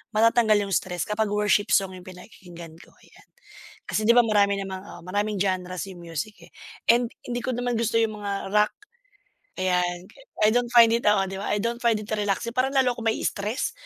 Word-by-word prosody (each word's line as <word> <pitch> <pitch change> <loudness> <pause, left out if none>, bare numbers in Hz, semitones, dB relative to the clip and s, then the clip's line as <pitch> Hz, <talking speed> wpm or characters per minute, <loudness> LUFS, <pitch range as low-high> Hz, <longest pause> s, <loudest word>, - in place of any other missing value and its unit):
matatanggal 225 -1 +4
yung - - -3
stress 180 -3 -2
kapag 210 0 -1
worship 210 0 +2
song 195 -1 +3
yung 180 - -13
pinakikinggan 175 -3 -12
ko, - - -17
ayan. - - -21 0.6
Kasi 215 - -1
'di 235 - +6
ba 245 - +7
marami 200 -2 +3
namang 190 -1 -6
oo - - -11
maraming 205 +2 -1
genre's 185 -2 -2
yung 175 -2 -11
music, 170 +5 -5
eh, - - -21 0.4
and 235 0 +3 0.2
hindi 245 0 -3
ko 255 - -1
naman 245 0 -2
gusto 230 -1 -1
yung 215 -2 0
mga 200 -1 -4
rock, 210 0 +4 0.9
ayan. 180 -1 0 0.4
I - - +6
don't 245 0 +1
find 235 -1 +8
it 235 - 0
oo 195 -2 +3
'di 195 - -6
ba? - - -2
I 210 - +1
don't 235 +2 -2
find 230 -2 +4
it 210 - -10
relaxing. 210 +2 -1
Parang 265 +2 +1
lalo 255 -2 +3
ako 230 - -7
ma-i-stress. 220 +1 -1
210 Hz, 200 wpm, -25 LUFS, 190-230 Hz, 0.9 s, find